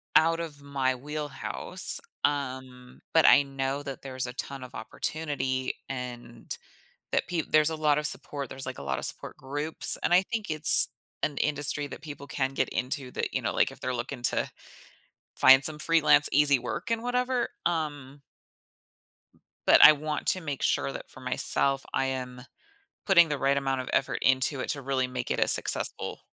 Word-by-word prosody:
out 165 +1 +4
of 155 -4 -7
my 135 -2 -1
wheelhouse, 145 +3 -1 0.2
um, 130 -3 -4
but 160 - +5
I - - +7
know 135 0 -4
that 135 -2 -8
there's 130 -2 -4
a 125 - -7
ton 135 +1 -6
of 125 - -11
opportunity 130 +1 -3 0.2
and 120 -3 -7 0.6
that - - 0
peop 170 -3 -3
there's 155 0 +5
a 160 - -4
lot 150 -2 +1
of 150 - +1
support. 140 -3 -2
There's, 135 0 -4
like, 130 -1 -6
a - - -8
lot 65 -1 -2
of - - -2
support - - -3
groups, 145 +4 0
and - - +1
I 185 - +4
think 215 -1 -5
it's 155 -1 +6 0.4
an 145 - -1
industry 145 0 +2
that - - -10
people 145 -2 -9
can 135 -1 -2
get - - 0
into 125 0 -4
that, - - -4
you - - 0
know, - - -2
like, - - +2
they're 130 0 -3
looking 120 +1 -6
to - - 0 0.9
find 135 +1 +7
some 155 -1 +1
freelance 160 -2 +4
easy 145 -2 +4
work 175 - -5
and 230 -1 0
whatever. 250 0 -1 0.2
Um 145 -5 -3 1.4
but - - +6
I 155 - +11
want 150 +1 -5
to 185 - +1
make 145 -4 -5
sure 70 0 0
that - - -9
for - - -14
myself, 135 0 +1
I 135 - 0
am 125 -1 -5 0.6
putting 170 -4 +6
the 145 -2 -2
right 140 +1 +1
amount 135 -1 -1
of 130 - -6
effort 135 - 0
into 130 +1 +1
it - - -5
to 140 - -4
really 130 -1 -1
make 125 -1 -6
it - - -1
a - - +2
successful - - +1
140 Hz, 180 wpm, -27 LUFS, 130-150 Hz, 1.4 s, I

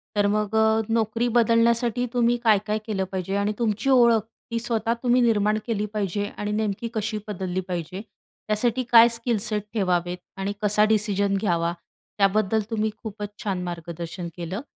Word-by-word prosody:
तर 205 0 +3
मग 215 0 -1
अ, 220 0 +4
नोकरी 230 +1 +1
बदलण्यासाठी 235 +1 +3
तुम्ही 240 0 +2
काय-काय 210 -1 +2
केलं 200 -4 -1
पाहिजे? 190 +1 -3
आणि 205 +1 0
तुमची 225 +3 0
ओळख 235 -4 +5 0.3
ती 230 - 0
स्वतः 230 -1 0
तुम्ही 250 0 +3
निर्माण 215 -2 +2
केली 210 -2 -1
पाहिजे 205 -1 -1
आणि 210 0 -3
नेमकी 215 +1 -2
कशी 215 0 -2
बदलली 185 -2 -3
पाहिजे? 180 +2 -4 0.5
त्यासाठी 230 +4 +1
काय 235 0 +8
स्किल 230 0 -1
सेट 210 -1 -2
ठेवावेत 180 -3 0 0.2
आणि 195 +1 -2
कसा 210 0 +3
डिसिजन 205 -2 +1
घ्यावा? 170 -4 0 0.4
त्याबद्दल 210 +2 +2
तुम्ही 220 -1 0
खूपच 210 -2 -5
छान 195 -3 -2
मार्गदर्शन 170 0 -6
केलं. 180 +5 -5
210 Hz, 155 wpm, -24 LUFS, 195-230 Hz, 0.5 s, काय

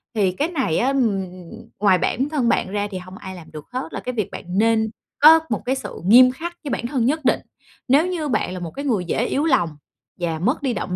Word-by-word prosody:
Thì 200 -4 +2
cái 285 - -1
này 265 - -1
á, 245 - +1
ừm, 245 -8 +1 0.6
ngoài 195 -2 +4
bản 260 - -1
thân 275 -6 +1
bạn 230 - +1
ra 205 +1 -2
thì 190 - -4
hông 185 +1 -10
ai 190 0 -8
làm 165 -3 -12
được 155 -2 -9
hết, 255 +1 -4
là - - -3
cái 250 - -5
việc 215 -5 -2
bạn - - -7
nên 220 0 +3 0.3
có 315 +3 +9
một 215 - -1
cái 260 - +1
sự 250 -6 -7
nghiêm 250 +6 +7
khắc 345 +6 -7
với 290 - -5
bản 235 - -2
thân 250 -3 0
nhất 300 +3 0
định. - - +3 0.5
Nếu 285 +7 +4
như 340 -4 -2
bạn 215 -7 -1
là 185 - -5
một 170 -2 -6
cái 280 - -6
người 215 -10 0
dễ 220 +7 0
yếu 280 - 0
lòng 175 - +1 0.4
và 165 -2 -2
mất 250 - 0
đi 265 -4 0
động 180 - -3
235 Hz, 250 wpm, -21 LUFS, 190-275 Hz, 0.6 s, có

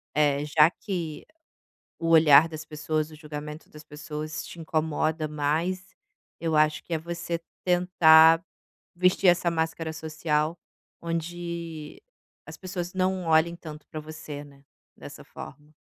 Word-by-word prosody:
é 145 -1 +2
já 150 +1 +5
que 175 -8 -5 0.7
o 165 - -2
olhar 155 -1 +7
das 155 -1 -7
pessoas, 155 0 -2
o - - -12
julgamento 150 0 -8
das 150 0 -12
pessoas 150 +1 -6
te 170 - -10
incomoda 155 0 -1
mais, 160 +5 -2 0.4
eu 165 -2 -1
acho 155 0 +2
que 175 - -10
é 160 - +1
você 170 +1 -4 0.2
tentar 165 -2 +6 0.5
vestir 185 +1 +3
essa 175 -1 +4
máscara 160 0 -2
social 155 0 -1 0.4
onde 170 - -5 0.4
as - - -9
pessoas 180 -1 -5
não 185 -1 0
olhem 165 +1 +3
tanto 150 -3 -10
para 155 - -6
você, 155 -1 -8
né, 140 -1 -18 0.3
dessa - - -11
forma. 150 +1 -11
160 Hz, 135 wpm, -26 LUFS, 150-170 Hz, 0.7 s, olhar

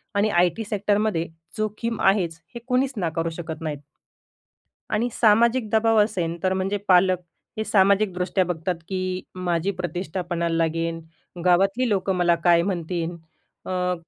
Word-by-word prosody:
आणि 205 +2 +3
आय-टी 180 +3 +2
सेक्टरमधे 205 -4 0 0.3
जोखीम 215 +1 -2
आहेच, 180 -5 +2 0.2
हे - - -4
कुणीच 260 +1 +1
नाकारू 165 -3 -1
शकत 160 -2 -6
नाहीत. 155 -3 -4 1.1
आणि 220 +3 0
सामाजिक 230 +1 +3
दबाव 225 +1 +3
असेन, 175 -6 -2
तर 185 0 +2
म्हणजे 190 +2 -1
पालक 185 0 +5 0.4
हे 220 - 0
सामाजिकदृष्ट्या 190 -2 +2
बघतात, 175 +1 -2
की 185 -1 -2
माझी 180 0 -1
प्रतिष्ठा 180 0 -3
पणाला 170 -1 0
लागेन, 165 0 -1 0.4
गावातली 195 +7 +3
लोकं 195 -2 0
मला 175 -1 +3
काय 170 -1 +5
म्हणतीन? 175 -2 -2 0.5
अ 180 -1 -1
185 Hz, 130 wpm, -24 LUFS, 170-210 Hz, 1.1 s, पालक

